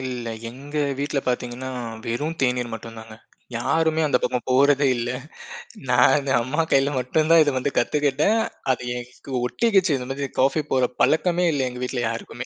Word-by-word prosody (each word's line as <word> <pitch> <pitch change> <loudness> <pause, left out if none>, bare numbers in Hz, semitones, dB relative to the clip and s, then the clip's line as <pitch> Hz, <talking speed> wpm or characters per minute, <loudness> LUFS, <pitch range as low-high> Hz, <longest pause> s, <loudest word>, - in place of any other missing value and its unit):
இல்ல. 125 -2 -5 0.2
எங்க 140 +5 -9 0.2
வீட்ல 145 0 -1
பாத்தீங்கன்னா, 125 +1 -3 0.4
வெறும் 150 +8 -2
தேநீர் 125 -2 0
மட்டுந்தாங்க. 110 0 -9 0.4
யாருமே 160 +6 +1
அந்தப் 135 -3 +1
பக்கம் 125 -1 -1
போறதே 140 +2 +4
இல்ல. 120 +1 -2 0.8
நானு 135 +3 +4
அம்மா 135 +7 -1
கையில 135 +1 +4
மட்டும்தான் 155 +6 +4
இத 145 - +1
வந்து 135 +2 -1
கத்துக்கிட்டேன். 150 +9 +2 0.3
அது 125 - -1
எனக்கு 125 +2 -9
ஒட்டிக்கிச்சு. 190 - +2
இந்த 125 -1 -6
மாதிரி 140 0 -3
காஃபி 135 +4 +2
போடுற 130 -2 +3
பழக்கமே 175 +2 +2
இல்ல 135 -3 0
எங்க 125 0 -9
வீட்ல 125 0 -2
யாருக்குமே. 120 +2 -6
135 Hz, 150 wpm, -23 LUFS, 125-150 Hz, 0.8 s, போறதே